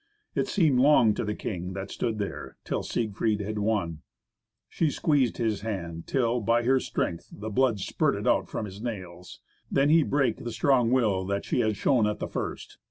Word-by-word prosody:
It -, -, 0 dB
seemed 155 Hz, -10 st, +3 dB
long 130 Hz, -5 st, +5 dB
to -, -, -3 dB
the 105 Hz, -1 st, -2 dB
king, 90 Hz, -2 st, -4 dB
that 95 Hz, +1 st, -6 dB
stood 115 Hz, -2 st, -2 dB
there, 100 Hz, -2 st, -5 dB
till -, -, -2 dB
Siegfried 110 Hz, -1 st, -1 dB
had 105 Hz, +1 st, -3 dB
won. 100 Hz, -7 st, -1 dB, 0.7 s
She 160 Hz, -, 0 dB
squeezed 145 Hz, -4 st, +1 dB
his 110 Hz, -4 st, -1 dB
hands 85 Hz, -6 st, -5 dB
till, 125 Hz, -2 st, +1 dB
by 115 Hz, +2 st, +2 dB
her 130 Hz, +2 st, +3 dB
strength, 85 Hz, -8 st, -3 dB
the 110 Hz, +1 st, -7 dB
blood 120 Hz, -1 st, +2 dB
spurted -, -, 0 dB
out -, -, +2 dB
from -, -, -3 dB
his 100 Hz, 0 st, -9 dB
nails. 90 Hz, -6 st, -7 dB, 0.3 s
Then 140 Hz, +2 st, +3 dB
he 165 Hz, +1 st, +6 dB
brake 140 Hz, -2 st, +1 dB
the 120 Hz, -, -6 dB
strong 125 Hz, +1 st, +3 dB
will 110 Hz, -7 st, +2 dB
that 100 Hz, 0 st, -2 dB
she -, -, 0 dB
had 110 Hz, -3 st, +1 dB
shown 120 Hz, -2 st, +3 dB
at 105 Hz, -, -1 dB
the -, -, -4 dB
first. -, -, -5 dB
110 Hz, 190 wpm, -27 LUFS, 100-125 Hz, 0.7 s, he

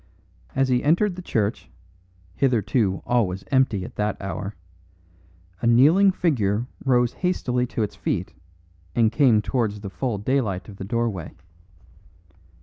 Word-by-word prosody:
As 135 Hz, 0 st, +2 dB
he 125 Hz, -1 st, +2 dB
entered 175 Hz, +6 st, +2 dB
the 185 Hz, -, -7 dB
church, 110 Hz, -, -2 dB, 0.6 s
hitherto 115 Hz, -4 st, +1 dB
always 95 Hz, -6 st, 0 dB
empty 120 Hz, -8 st, +2 dB
at -, -, -11 dB
that 105 Hz, 0 st, -1 dB
hour, 100 Hz, +2 st, -5 dB, 1.1 s
a -, -, +1 dB
kneeling 155 Hz, +12 st, +6 dB
figure 120 Hz, -, 0 dB, 0.2 s
rose 125 Hz, -3 st, +2 dB
hastily 125 Hz, -9 st, -1 dB
to 115 Hz, -, -2 dB
its 105 Hz, -, -4 dB
feet -, -, -3 dB, 0.6 s
and 115 Hz, -2 st, +3 dB
came 120 Hz, -6 st, +4 dB
towards 105 Hz, -5 st, -1 dB
the 100 Hz, -2 st, -7 dB
full 115 Hz, +3 st, -2 dB
daylight 105 Hz, -4 st, -1 dB
of 100 Hz, -3 st, -11 dB
the 95 Hz, -, -6 dB
doorway. 115 Hz, -5 st, -2 dB
115 Hz, 135 wpm, -24 LUFS, 100-130 Hz, 1.1 s, kneeling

